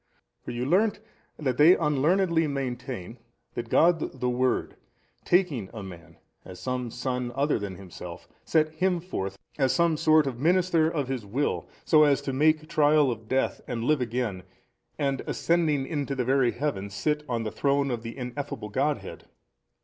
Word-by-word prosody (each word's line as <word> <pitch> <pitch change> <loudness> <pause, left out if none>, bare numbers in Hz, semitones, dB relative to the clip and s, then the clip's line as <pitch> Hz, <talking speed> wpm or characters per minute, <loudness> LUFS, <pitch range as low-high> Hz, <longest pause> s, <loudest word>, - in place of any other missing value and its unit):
For - - -8
you 120 +1 -3
learnt 200 +9 +2 0.4
that 130 -5 -1
they 165 +5 +8
unlearnedly 165 +3 +2
maintain 125 -5 -5 0.3
that 120 -1 -5
God 165 -4 +2
the 125 - 0
Word 125 +1 0 0.5
taking 155 - +1
a 110 - -6
man, 85 -3 -11 0.3
as 90 -1 -11
some 125 0 -3
son 125 0 -3
other 140 -2 +1
than 100 -2 -5
Himself, 90 -2 -10 0.2
set 155 -1 +2
him 180 +3 0
forth, 100 - -5 0.2
as 135 +3 +2
a 170 -2 +3
sort 155 0 +4
of 125 -3 -4
minister 170 0 +3
of 145 -5 -2
His 130 -4 -3
Will, 125 +9 -2 0.2
so 155 -2 +5
as 145 -2 +5
to 135 - -3
make 155 +3 +2
trial 150 -3 +4
of 110 -1 -7
death, 130 +4 0
and 115 -2 -3
live 150 +1 +2
again, 120 -5 -2 0.6
and 140 -2 0
ascending 160 -5 +1
into 140 -2 -3
the 125 -2 -1
very 130 -1 +3
heaven, 120 -7 -2
sit 150 +10 -1
on 115 -2 -1
the 110 - -3
Throne 140 +2 +1
of 120 -2 -2
the 115 +2 -8
Ineffable 125 -3 -5
Godhead! 140 +7 -2
135 Hz, 165 wpm, -27 LUFS, 120-155 Hz, 0.6 s, they